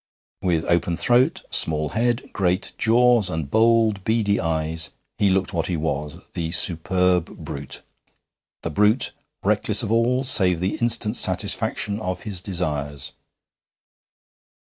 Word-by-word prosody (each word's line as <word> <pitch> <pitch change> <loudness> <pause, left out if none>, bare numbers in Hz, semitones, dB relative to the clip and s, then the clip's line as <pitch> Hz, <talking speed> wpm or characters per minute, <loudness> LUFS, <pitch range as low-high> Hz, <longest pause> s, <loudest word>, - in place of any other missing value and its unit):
With 85 -3 0
open 85 0 +1
throat, 125 +6 +2
small 75 -1 +1
head, 120 +3 -1
great 90 0 0
jaws, 120 -3 +4
and 80 -5 -4
bold 110 -3 +3
beady 110 -2 +1
eyes, 80 -2 -1 0.3
he 100 - +4
looked 95 0 0
what 85 -2 -1
he 90 - -1
was, 75 -2 -3 0.2
the 80 -2 -3
superb 90 +1 +2 0.2
brute 70 -1 -7 0.8
the 80 - -3
brute 105 - +2 0.3
reckless - - +1
of - - -3
all 120 +3 +2
save 95 -9 +2
the 95 +3 -1
instant 115 -1 0
satisfaction 105 0 0
of 95 -4 -4
his 100 -5 -4
desires. 75 -7 -3
95 Hz, 125 wpm, -23 LUFS, 80-110 Hz, 0.8 s, jaws